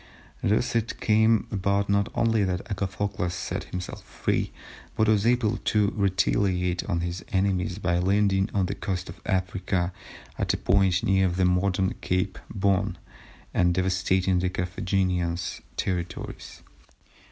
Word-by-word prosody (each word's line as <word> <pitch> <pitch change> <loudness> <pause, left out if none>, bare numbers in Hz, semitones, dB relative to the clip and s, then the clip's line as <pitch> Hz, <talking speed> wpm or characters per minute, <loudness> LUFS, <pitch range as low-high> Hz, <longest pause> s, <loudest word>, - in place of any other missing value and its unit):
Thus 110 +4 +1
it 115 0 -1
came 110 0 +3
about 100 0 +1
not 100 0 +2
only 115 -2 +2
that 95 -1 -1
Agathocles 95 -2 -2
set - - -4
himself 90 0 -6
free, - - -1 0.4
but 110 - +2
was 110 0 +3
able 120 -2 +2
to 105 -2 +1
retaliate 95 -2 +1
on 85 - -1
his 85 +1 -4
enemies 95 -2 +1
by 85 -3 +1
landing 95 +1 +2
on 95 -2 +1
the 90 - -2
coast 95 -3 -3
of - - -10
Africa 95 -2 0 0.5
at - - +1
a - - -2
point 95 -1 +2
near 95 -1 +3
the 90 +1 +1
modern 95 +1 +2
Cape 90 0 -1
Bon, 95 -1 +1 0.6
and 90 -1 +3
devastating 95 0 +2
the 90 0 0
Carthaginian 90 -1 -1 0.4
territories. 90 -2 -4
95 Hz, 135 wpm, -26 LUFS, 90-100 Hz, 0.6 s, came